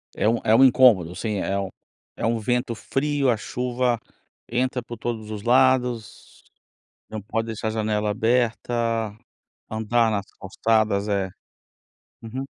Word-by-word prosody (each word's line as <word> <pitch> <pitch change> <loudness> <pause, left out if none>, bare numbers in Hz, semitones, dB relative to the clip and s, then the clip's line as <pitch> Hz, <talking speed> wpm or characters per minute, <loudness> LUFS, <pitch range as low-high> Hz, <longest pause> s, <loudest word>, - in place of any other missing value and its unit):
É - - +1
um 115 +1 +2
é 110 - +4
um 130 - +7
incômodo, 120 -10 +5
sim, 110 -3 -2
é 95 +1 -1
um 95 - -3 0.5
é - - -3
um 115 0 +1
vento 120 +2 0
frio 140 +4 0
a 115 - +2
chuva 125 +1 -1 0.5
entra 125 +1 0
por 120 0 -9
todos 110 -1 -4
os 105 -2 -6
lados 125 -2 +1 0.7
não 110 -1 -5
pode 115 +3 -3
deixar 110 0 -3
janela 105 -1 -1
aberta 120 +2 0 1.0
andar 110 +1 +1
nas 100 -2 -1
calçadas, 105 +1 +1
é, 100 -2 0 0.9
uhum. 120 +4 -5
115 Hz, 140 wpm, -24 LUFS, 105-125 Hz, 1.0 s, um